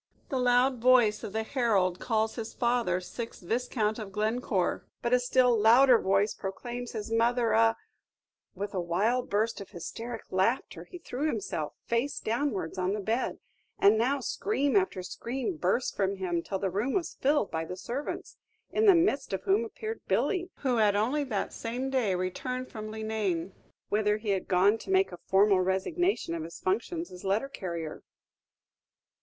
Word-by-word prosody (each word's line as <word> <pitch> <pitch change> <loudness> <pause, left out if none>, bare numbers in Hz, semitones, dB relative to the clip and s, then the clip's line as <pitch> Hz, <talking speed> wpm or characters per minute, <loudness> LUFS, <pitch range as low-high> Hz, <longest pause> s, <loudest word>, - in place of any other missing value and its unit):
The 265 - -1
loud 250 +1 +3
voice 240 -4 +4
of - - -5
the 220 +2 -1
herald 210 -8 +1
calls 220 -2 0
his 225 -2 -6
father 235 -7 +1
Sixth 230 +5 -7
Viscount 220 +1 -1
of 210 -3 -6
Glencore, 215 -2 0 0.2
but 240 - +1
a 250 - +6
still 250 0 +3
louder 235 +3 +6
voice 195 +2 +2
proclaims 240 +5 -6
his 220 0 -5
mother 235 +1 +2
a 225 0 +4 0.4
" - - -55
With 200 +2 -4
a 185 - -1
wild 210 +9 0
burst 215 +2 0
of 195 - -9
hysteric 225 +6 -6
laughter, 190 +7 0
he 360 - -10
threw 300 -3 -3
himself, 195 - -3
face 245 +5 0
downwards, 215 - -2
on 185 +1 0
the 210 - -2
bed; 225 +5 -1 0.4
and 205 +2 +6
now 255 +6 +1
scream 285 - 0
after 190 -1 +1
scream 260 - -4
burst 260 -4 0
from 195 0 0
him, 180 -3 -1
till 195 - -3
the 190 -1 -2
room 215 +8 -1
was 360 -4 -1
filled 285 -5 +1
by 160 0 -2
the 180 +3 -6
servants, 255 +9 -5 0.3
in 435 0 +2
the 390 - +8
midst 330 - +1
of 190 0 -2
whom 200 +4 +3
appeared 440 - -6
Billy, 365 -3 +1
who 255 -4 +1
had 210 -2 +4
only 250 +8 +1
that 215 -7 -2
same 250 +3 -3
day 230 -8 +1
returned 250 +8 -3
from 215 -2 -6
Leenane, 215 -5 -2 0.4
whither 210 0 +2
he 215 -1 -5
had 190 -1 -1
gone 195 +4 +4
to - - -11
make 380 0 +3
a 175 - -9
formal 195 0 +5
resignation 190 - 0
of 165 - -3
his 165 +1 -8
functions 280 - -2
as 180 - -11
letter 200 +7 0
carrier. 170 - -5
220 Hz, 175 wpm, -29 LUFS, 195-250 Hz, 0.4 s, the